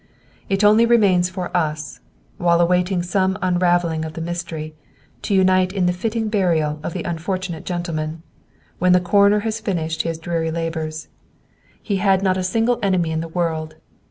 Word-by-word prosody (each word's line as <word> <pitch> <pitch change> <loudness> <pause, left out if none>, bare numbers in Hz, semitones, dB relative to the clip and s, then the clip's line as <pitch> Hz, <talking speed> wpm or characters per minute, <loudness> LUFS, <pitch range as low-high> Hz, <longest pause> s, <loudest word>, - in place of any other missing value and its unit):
"It 195 +1 +1
only 215 +3 +6
remains 195 -6 +4
for 185 -1 -5
us, 155 -3 -2 0.4
while 170 -1 +3
awaiting 180 +1 +2
some 190 +1 0
unravelling 175 -3 +1
of 160 0 -6
the 165 - -7
mystery, 165 -2 -5 0.5
to 205 - -1
unite 185 -1 +3
in 190 -3 0
the 180 - +2
fitting 220 +4 -2
burial 165 -8 +1
of 160 - -5
the 180 - -4
unfortunate 175 0 -4
gentleman, 165 -3 -4 0.6
when 180 0 +4
the 180 - +5
Coroner 200 +3 +3
has 225 +1 -2
finished 165 -6 -2
his 165 -1 -3
dreary 165 0 -2
labors. 160 -1 -4 0.8
He 200 -3 -1
had 195 0 +2
not 190 -1 +2
a 185 - -1
single 225 +6 +1
enemy 185 -5 +1
in 160 0 -1
the 165 - -5
world! 160 -2 -2
175 Hz, 165 wpm, -21 LUFS, 165-190 Hz, 0.8 s, only